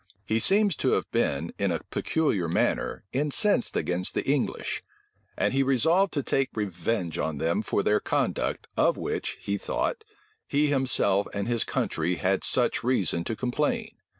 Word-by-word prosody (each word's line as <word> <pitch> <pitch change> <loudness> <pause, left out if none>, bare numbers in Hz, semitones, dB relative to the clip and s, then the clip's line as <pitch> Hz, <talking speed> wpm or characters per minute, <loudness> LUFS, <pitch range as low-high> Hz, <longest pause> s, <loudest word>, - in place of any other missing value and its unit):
He 110 +3 +1
seems 200 - +4
to - - +1
have - - +1
been, 70 +4 0
in 100 -2 +1
a 85 - -2
peculiar 105 - 0
manner, 85 - 0
incensed 150 - +1
against 90 +1 -1
the - - -1
English; 140 -1 -1 0.6
and - - +1
he 135 - +2
resolved 160 +8 +3
to 145 - -1
take 135 +1 0
revenge 95 -3 -2
on 80 -2 -2
them 85 +7 0
for 100 -1 -1
their 105 - +3
conduct, - - -1
of - - +2
which, - - -3
he 100 0 -2
thought, 335 - -2 0.4
he 145 +1 +2
himself 125 -8 +3
and 100 +1 -2
his 120 -1 +2
country 85 +3 -1
had 95 +2 0
such - - +2
reason 100 -9 +1
to 115 - -2
complain. 150 - -1
115 Hz, 160 wpm, -27 LUFS, 95-145 Hz, 0.6 s, seems